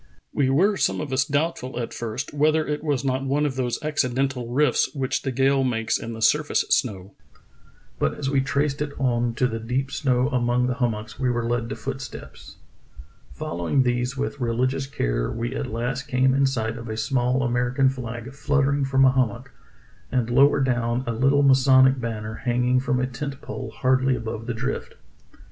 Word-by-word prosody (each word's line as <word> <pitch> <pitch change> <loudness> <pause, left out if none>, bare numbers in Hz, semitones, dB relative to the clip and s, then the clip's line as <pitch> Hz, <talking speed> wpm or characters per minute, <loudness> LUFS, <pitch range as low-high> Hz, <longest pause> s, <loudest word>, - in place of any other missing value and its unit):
We 135 -2 +2
were 190 +9 +3
some - - +1
of 140 - -4
us 130 +1 +3
doubtful 145 -4 -2
at 115 - -4
first 120 +5 -5
whether 155 +2 +2
it 150 0 -3
was 145 -3 -1
not 130 0 0
one 140 +2 +1
of 140 -3 -2
those 125 -2 -1
acci 150 -4 0
dental 130 -3 -1
rifts 145 +6 +1
which 135 -2 -1
the 135 - -2
gales 135 +1 +2
make 115 -2 0
in 115 0 -6
the 110 0 -5
surface 150 +4 +3
snow. 100 -6 0 0.9
But - - 0
as 140 - -3
we 135 0 +2
traced 140 +1 -1
it 145 -1 -4
on 120 -3 0
to 125 - +1
the 115 -2 -2
deep 130 +4 -2
snow 130 -3 +1
among 125 -1 +1
the 125 - 0
hum 125 -2 0
mocks 110 +2 -9
we 130 -2 +1
were 120 -1 -1
led 120 -1 -1
to - - -4
footsteps. 120 - -8 0.8
Following 85 +11 0
these 125 +1 -1
with 140 +1 -3
religious 130 +3 0
care, - - -1
we 120 +3 -3
at 135 - -3
last 125 +3 -3
came 130 +1 +2
in 135 0 +3
sight 115 -3 -2
of 115 0 -8
a 110 - -4
small 125 +1 +1
Amer 120 0 0
ican 135 0 +3
flag 125 0 -7
fluttering 140 0 +1
from 135 0 +3
a 130 - +6
hummock, 130 0 -1 0.6
and 120 -2 0
lower 140 +3 +5
down 120 -1 0
a 115 - -2
little 135 +5 +3
masonic 130 -1 +5
banner 110 -2 -4
hanging 125 +1 +2
from 130 -1 0
a 125 - +1
tent 135 +2 -5
pole - - -6
hardly 130 0 +1
above 115 -1 -5
the 120 - -2
drift. 135 +4 -4
130 Hz, 195 wpm, -24 LUFS, 120-135 Hz, 0.9 s, a